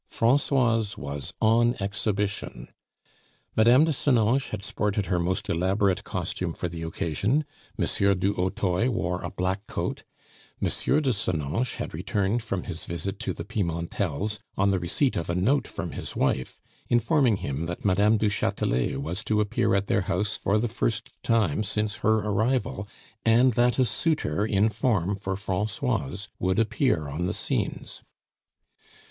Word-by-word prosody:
Francoise 120 -3 +2
was 70 0 -5
on 120 +2 +4
exhibition. 100 0 -2 0.9
Mme. 120 +6 +6
de 160 - +2
Senonches 130 -1 +2
had 105 -2 -5
sported 105 -1 -1
her 90 0 0
most 95 +4 -1
elaborate 95 +2 +1
costume 90 -2 -3
for 90 - -3
the 85 -1 -7
occasion; 85 - 0 0.3
M. - - +1 0.3
du 95 +2 +1
Hautoy 95 +3 0
wore 90 -7 -1
a - - -4
black 95 +3 -2
coat; - - -3 0.6
M. - - 0
de 140 -3 +1
Senonches 90 - -1
had - - -5
returned 100 +6 0
from 100 -5 -3
his 80 - -4
visit 85 +3 -3
to - - -2
the - - -6
Pimentels 90 +1 -2 0.2
on 100 +1 +3
the 95 - +1
receipt 95 - 0
of 85 - -3
a 85 - 0
note 120 +11 +2
from - - -5
his - - -6
wife, 65 - 0 0.3
informing 120 0 +3
him 70 0 -3
that 85 +3 -6
Mme. 100 +3 +4
du 105 - +1
Chatelet 65 -10 0
was 90 +8 -3
to 110 -1 +1
appear 105 -2 +1
at 100 0 +1
their 100 - +1
house 95 +2 0
for 100 - +1
the 115 +3 +1
first 115 -1 -2
time 110 -5 +2
since 105 +1 -1
her 110 0 +2
arrival, 110 -1 0 0.4
and 120 +3 +5
that 120 +2 +3
a 130 - +4
suitor 115 - 0
in 105 +1 +3
form 100 -5 0
for 95 -1 -3
Francoise 100 -2 -2
would 95 +1 +1
appear 110 - +1
on 80 +5 -2
the - - -2
scenes. - - -2
100 Hz, 155 wpm, -26 LUFS, 90-115 Hz, 0.9 s, Mme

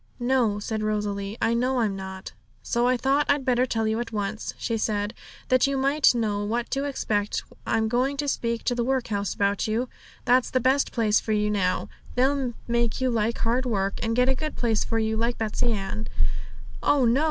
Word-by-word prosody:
'No,' 240 -4 +2
said 215 +1 -3
Rosalie; 210 -1 -2
'I 230 - +3
know 250 +2 +1
I'm 210 -4 +1
not.' 190 0 -7 0.3
'So 240 +1 +1
I 255 0 +3
thought 270 +4 +2
I'd 285 -2 +2
better 250 0 +2
tell 225 -2 0
you 220 +1 0
at 240 -1 -4
once,' 210 0 -3
she 230 - -2
said,'that 220 +4 -1
you 275 0 0
might 275 0 +4
know 210 -3 0
what 235 +3 -2
to 275 +1 0
expect. 210 -7 -1 0.2
I'm 220 0 +2
going 255 +5 0
to 290 0 -2
speak 235 -4 -1
to 245 - +1
the 240 -1 0
workhouse 235 -6 -1
about 200 +1 +1
you 230 +3 -1 0.4
that's 250 +1 +4
the 255 - +1
best 265 +3 +2
place 220 -3 +2
for 220 - -2
you 210 0 +1
now; 185 -3 0 0.3
they'll 260 -1 +1
make 235 -1 +1
you 260 -1 +1
like 225 0 0
hard 245 +3 0
work, 195 -4 -1
and 225 0 0
get 250 +1 +3
a 265 - +4
good 305 +3 -4
place 225 -3 +1
for 225 - -1
you, 220 0 0
like 235 +2 0
Betsey 225 +2 0
Ann.' 210 +1 -3 0.7
'Oh 280 -3 +3
no!' 235 +3 +4
230 Hz, 200 wpm, -25 LUFS, 215-255 Hz, 0.7 s, might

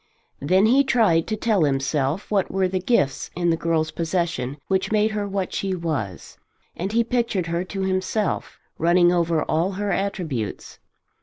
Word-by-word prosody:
Then 185 +8 +3
he 260 +5 +5
tried 220 -11 +3
to 220 - -1
tell 215 -4 +1
himself 140 +5 0
what 200 -2 +1
were 190 -1 +1
the 185 0 -1
gifts 180 - 0
in 175 0 +1
the - - +2
girl's 165 -1 0
possession 165 -5 -2
which 190 +1 0
made 215 0 +2
her 210 -1 -2
what 195 -2 -3
she 195 -1 -1
was, 145 - -4 0.4
and 190 +4 -3
he 235 +1 +3
pictured 235 -6 0
her 170 +1 -1
to 195 +1 -5
himself, 190 +3 -1 0.2
running 175 +1 +4
over 170 -3 +1
all 170 +5 0
her 205 +1 -2
attributes. 175 - -3
185 Hz, 165 wpm, -23 LUFS, 165-200 Hz, 0.4 s, he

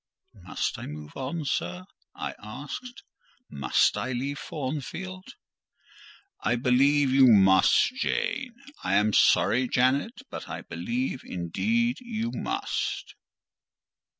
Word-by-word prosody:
"Must - - -4
I - - -6
move 75 0 -9
on, 140 +4 -4
sir?" 90 -8 -2 0.3
I - - -4
asked. 145 - -8 0.5
"Must 70 -3 +2
I 130 +1 -2
leave 135 +4 -3
Thornfield?" 175 - -5 1.0
"I 120 - +1
believe 135 +3 +3
you 135 0 +6
must, 95 - +5
Jane. 270 - -1 0.3
I - - +1
am 105 +1 +3
sorry, 125 +6 +4
Janet, 130 - +1
but - - -7
I - - -5
believe 240 - -3
indeed 225 - 0
you 235 -1 -3
must." 390 +1 -3
135 Hz, 110 wpm, -27 LUFS, -, 1.0 s, you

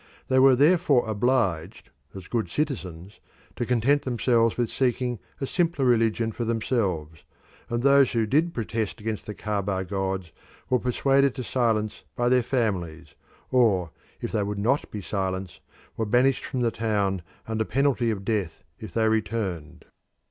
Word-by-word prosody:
They 130 - +4
were 135 0 +7
therefore 145 -3 +4
obliged 105 -5 0 0.2
as 95 -2 -9
good 115 -3 -2
citizens 100 - -4 0.4
to 120 - -3
content 125 +4 +2
themselves 115 -2 +1
with 120 -2 0
seeking 125 -2 0 0.2
a 135 - -1
simpler 165 -2 0
religion 115 -2 +2
for 120 - -4
themselves, 100 - -1 0.5
and 120 +1 -1
those 140 -1 +5
who 115 -2 +2
did 155 +10 +2
protest 115 -5 -3
against 110 0 -4
the 105 - -5
Caaba 100 -3 -2
gods 95 -3 -3 0.4
were 125 - +4
persuaded 135 +2 +2
to 130 - -4
silence 110 -4 0
by 120 0 +1
their 125 0 +4
families, 100 -10 -2 0.4
or, 100 -10 +3 0.3
if - - -4
they 110 - 0
would 100 0 -3
not 120 +8 0
be 105 - -6
silent, 95 -2 -3 0.4
were 110 - -1
banished 125 +4 +2
from 130 -2 -3
the 115 -1 +2
town 100 -5 -1 0.3
under 110 0 -1
penalty 130 -1 +1
of 100 -3 -3
death 95 - -2 0.2
if 105 -6 -9
they 110 -1 +3
returned. 100 -8 -2
115 Hz, 155 wpm, -25 LUFS, 100-125 Hz, 0.5 s, were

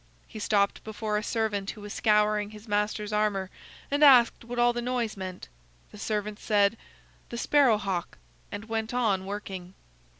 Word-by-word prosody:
He 215 - -9
stopped 200 -1 +1
before 215 -1 -2
a - - -7
servant 210 -3 -1
who 215 - -7
was 205 0 -7
scouring 210 -1 +2
his 215 +1 -13
master's 210 0 -1
armor, 205 -3 0 0.4
and 290 +1 +2
asked 250 -6 +6
what 240 +1 -7
all 240 0 +4
the 240 - -3
noise 240 -2 -2
meant. 185 -2 -7 0.4
The - - -12
servant 210 -1 -3
said: 205 0 +2 0.5
"The 235 - -5
Sparrow 265 -3 +4
hawk," 190 -4 -3 0.3
and 205 - -6
went 225 +1 -3
on 200 -6 +1
working. 190 -3 -6
210 Hz, 165 wpm, -28 LUFS, 205-230 Hz, 0.5 s, asked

